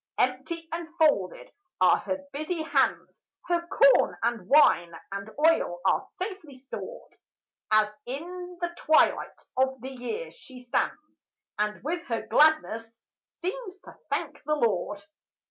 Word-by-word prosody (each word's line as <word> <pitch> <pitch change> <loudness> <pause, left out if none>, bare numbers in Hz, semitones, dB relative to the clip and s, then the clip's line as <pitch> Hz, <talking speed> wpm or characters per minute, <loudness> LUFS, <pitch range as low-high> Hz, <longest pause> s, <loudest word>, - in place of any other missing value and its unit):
Empty 270 +7 -1
and 335 0 -4
folded - - +2 0.3
are - - +6
her 285 0 -4
busy 315 +3 -3
hands; 315 - 0 0.2
Her 340 -1 0
corn 275 -8 +5
and 230 -5 -1
wine 185 - +5 0.2
and 200 +2 -5
oil 305 - +3
are - - +3
safely 370 -7 -7
stored, 260 +1 -9 0.6
As 215 0 +5 0.2
in 355 +7 -6
the 345 0 -1
twilight 315 -2 +2
of 265 0 +1
the 260 +3 -7
year 265 - -5
she 270 - -13
stands, 245 -1 -1 0.6
And 210 +1 -1
with 335 +4 -2
her 230 -3 -2
gladness 230 -5 +2 0.3
seems 380 +1 -6
to - - -13
thank - - -3
the 305 - +1
Lord. 205 -7 0
290 Hz, 130 wpm, -27 LUFS, 235-340 Hz, 0.6 s, are